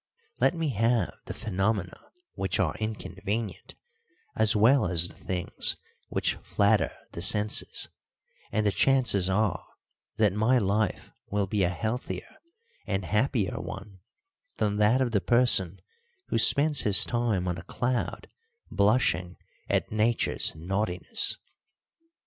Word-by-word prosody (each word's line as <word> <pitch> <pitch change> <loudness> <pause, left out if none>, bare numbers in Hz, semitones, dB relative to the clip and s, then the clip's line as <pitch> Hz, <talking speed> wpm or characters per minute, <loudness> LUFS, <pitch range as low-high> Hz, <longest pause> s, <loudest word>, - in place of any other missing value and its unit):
Let - - +3
me 165 -2 -1
have 115 -4 +1
the - - -6
phenomena 95 -2 -2 0.4
which 95 - -2
are - - +1
inconvenient 110 0 -5 0.6
as 110 -1 +2
well 115 +3 +4
as 85 -1 +4
the - - -14
things 90 -2 -1 0.3
which - - 0
flatter - - +1 0.2
the 85 - -7
senses, 105 +3 +1 0.6
and 110 - 0
the 105 - +3
chances 115 -8 +2
are 105 +1 0 0.5
that 105 -4 +3
my 110 +5 +2
life 105 0 -1 0.2
will 100 0 0
be 100 +1 -1
a 90 - +2
healthier 110 +8 -5 0.5
and 95 -2 -2
happier 105 +1 0
one 100 -3 -9 0.6
than 105 -1 0
that 105 +5 +3
of 125 -2 0
the 100 -3 +1
person 100 -7 +2 0.5
who - - +1
spends 145 +4 +5
his 100 -2 +7
time 115 -7 -1
on 90 -1 -2
a - - -10
cloud 120 +4 -3 0.4
blushing 100 -4 +1 0.3
at - - 0
Nature's 110 -3 0
naughtiness. 95 - -1
105 Hz, 125 wpm, -27 LUFS, 95-120 Hz, 0.6 s, his